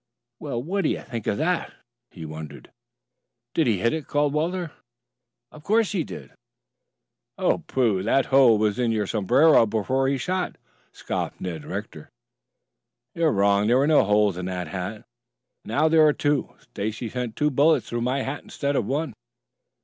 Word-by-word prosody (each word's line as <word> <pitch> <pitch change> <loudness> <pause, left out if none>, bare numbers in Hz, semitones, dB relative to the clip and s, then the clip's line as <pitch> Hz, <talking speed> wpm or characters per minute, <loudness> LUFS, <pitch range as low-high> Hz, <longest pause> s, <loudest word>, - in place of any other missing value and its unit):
"Well, 120 0 -4
what 195 +6 -1
do - - +2
you - - -2
think 115 -4 -7
of - - 0
that?" 170 +3 -1 0.4
he 80 -3 -10
wondered. 80 0 -9 0.8
"Did 160 - +2
he 110 -4 +2
hit 115 +8 +1
it?" 160 -2 -4
called 145 -1 +1
Walter. 170 +2 -1 0.8
"Of 155 - -13
course 220 +3 +2
he 190 -6 0
did." - - -10 1.1
"Oh, - - +1
pooh! 115 -8 +1
That 120 +6 +2
hole 130 -5 +6
was 105 +1 0
in 120 -2 +1
your 110 -2 0
sombrero 115 - +4
before 130 +5 0
he 135 0 +1
shot," 180 +7 -2 0.4
scoffed - - -4
Ned 85 -5 -5
Rector. - - -7 1.0
"You 170 - 0
are 155 - +4
wrong. 100 +1 +2
There 120 +3 +4
were 135 - +3
no 155 0 +5
holes 105 -2 +2
in 90 - -4
the 90 -1 -3
hat. 95 +6 -6 0.6
Now 155 +3 +1
there 160 0 +5
are 150 - +4
two. 145 -1 -1
Stacy 110 +3 -5
sent 120 -1 -4
two 150 0 +1
bullets 150 +4 +3
through 120 0 -3
my 130 +3 0
hat 140 +2 -4
instead 140 0 -3
of - - 0
one." 145 -1 -2
125 Hz, 170 wpm, -24 LUFS, 105-150 Hz, 1.1 s, hole